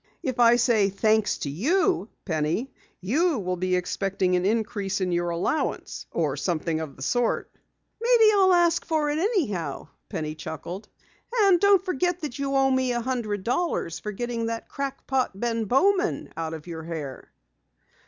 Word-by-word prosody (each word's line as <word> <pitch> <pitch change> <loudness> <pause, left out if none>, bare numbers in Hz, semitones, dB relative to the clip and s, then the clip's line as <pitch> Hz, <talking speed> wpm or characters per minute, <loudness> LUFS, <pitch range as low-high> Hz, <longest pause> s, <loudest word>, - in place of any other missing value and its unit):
"If 255 -2 -2
I 235 0 +7
say 230 -4 +3
thanks 215 +2 +2
to 140 - -4
you, 325 - +1 0.2
Penny, 165 - -1 0.3
you 300 - +1
will 185 -3 -2
be 185 +1 0
expecting 185 0 0
an 180 +1 +1
increase 210 -3 -1
in 185 -1 -1
your 175 0 0
allowance 170 - -2
or 150 -5 -1
something 160 +1 -1
of 155 -3 -6
the 135 - -8
sort." 245 - 0 0.5
"Maybe 465 -2 +6
I'll 380 -2 +5
ask 345 -2 +3
for 310 -2 0
it 300 - -1
anyhow," 235 - -1 0.2
Penny 155 -1 -3
chuckled. 165 +5 -7 0.4
"And 400 -7 +4
don't 400 -1 +4
forget 355 +1 0
that 285 -4 -5
you 275 0 -1
owe 270 0 +4
me 260 -1 +1
a 240 - 0
hundred 230 -6 -2
dollars 245 - -1
for 210 - -5
getting 230 +2 -3
that 230 0 -4
crack 275 -1 -5
pot, 260 -7 -1
Ben 230 -1 -1
Bowman, 380 - +1
out 160 -1 -3
of 155 - -10
your 165 -2 -6
hair!" 155 -5 -7
230 Hz, 165 wpm, -25 LUFS, 180-295 Hz, 0.5 s, I